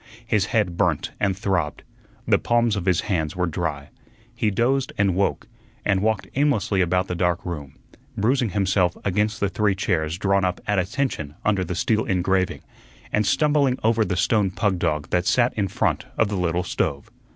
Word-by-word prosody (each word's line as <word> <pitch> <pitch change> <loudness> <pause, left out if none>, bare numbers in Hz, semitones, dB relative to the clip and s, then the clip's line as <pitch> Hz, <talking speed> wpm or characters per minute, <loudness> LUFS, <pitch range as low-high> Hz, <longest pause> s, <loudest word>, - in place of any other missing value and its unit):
His 105 -4 +1
head 100 -7 0
burnt - - +1
and 95 -2 0
throbbed. 95 -6 -1 0.4
The - - +4
palms 120 -2 +2
of 95 -4 -3
his 90 -2 +2
hands 80 -7 -2
were 90 0 0
dry. 80 -4 -3 0.4
He 115 -2 0
dozed 130 +7 +1
and 100 -2 +2
woke, 100 +2 0 0.4
and 95 -1 +2
walked 110 -2 0
aimlessly 125 -9 +1
about 90 +1 +1
the 90 - -3
dark 90 -1 0
room, 75 -6 -6 0.4
bruising 120 +3 +2
himself 95 -2 +1
against 105 +3 0
the 100 - +1
three 95 +1 +1
chairs 80 -4 -1
drawn 100 0 +1
up 90 -1 0
"at 105 -2 +1
attention" 95 - -2
under 100 -3 +2
the 90 - -4
steel 110 +5 +1
engraving, 95 0 0 0.5
and 105 -1 +1
stumbling 145 -4 +2
over 110 0 +3
the 95 -4 -2
stone 105 0 +2
pug 95 -1 0
dog 75 -3 -1
that 90 0 +1
sat 125 0 +3
in 100 -3 -1
front - - -1
of 110 - +2
the 105 - -2
little 90 -1 0
stove. 70 -5 -2
95 Hz, 180 wpm, -23 LUFS, 90-110 Hz, 0.5 s, The